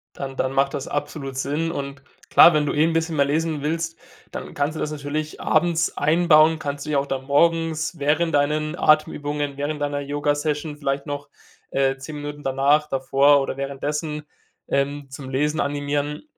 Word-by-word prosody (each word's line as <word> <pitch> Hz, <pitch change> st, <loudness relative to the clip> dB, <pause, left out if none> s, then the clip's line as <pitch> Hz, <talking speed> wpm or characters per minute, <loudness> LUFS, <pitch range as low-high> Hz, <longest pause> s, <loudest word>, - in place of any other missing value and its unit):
Dann 135 Hz, -1 st, -6 dB
dann 130 Hz, 0 st, -1 dB
macht 135 Hz, 0 st, +2 dB
das 140 Hz, -, -4 dB
absolut 140 Hz, -2 st, -4 dB
Sinn 150 Hz, +5 st, -1 dB
und 140 Hz, -2 st, -5 dB, 0.3 s
klar, 170 Hz, -, +8 dB
wenn 150 Hz, -1 st, +2 dB
du -, -, -1 dB
eh 150 Hz, +2 st, +3 dB
'n 165 Hz, -, 0 dB
bisschen 165 Hz, -1 st, -1 dB
mehr 140 Hz, -, +4 dB
lesen 155 Hz, +1 st, -1 dB
willst, 165 Hz, +2 st, -2 dB, 0.3 s
dann -, -, -7 dB
kannst 145 Hz, +2 st, -1 dB
du -, -, -5 dB
das 150 Hz, -, -2 dB
natürlich 150 Hz, +1 st, -4 dB
abends 170 Hz, +1 st, +1 dB
einbauen, 160 Hz, 0 st, +4 dB
kannst 145 Hz, -1 st, -4 dB
du -, -, -6 dB
ja 140 Hz, -, +3 dB
auch 140 Hz, -, -2 dB
dann 135 Hz, -1 st, -4 dB
morgens 165 Hz, +2 st, +1 dB
während 155 Hz, +4 st, +1 dB
deinen 150 Hz, +3 st, +1 dB
Atemübungen, 145 Hz, -2 st, +1 dB
während 145 Hz, +1 st, -3 dB
deiner 145 Hz, 0 st, -1 dB
Yogasession 145 Hz, +1 st, -2 dB
vielleicht 140 Hz, -1 st, -2 dB
noch, 145 Hz, 0 st, -5 dB, 0.4 s
äh, 135 Hz, 0 st, +1 dB
10 140 Hz, +3 st, -8 dB
Minuten 145 Hz, 0 st, -7 dB
danach, 140 Hz, +3 st, +2 dB
davor 135 Hz, +2 st, +3 dB
oder 135 Hz, 0 st, -3 dB
währenddessen, 150 Hz, +2 st, -3 dB, 0.5 s
ähm, 140 Hz, 0 st, -1 dB
zum 130 Hz, 0 st, -8 dB
Lesen 150 Hz, +4 st, 0 dB
animieren. 145 Hz, -, -2 dB
145 Hz, 175 wpm, -23 LUFS, 140-155 Hz, 0.5 s, klar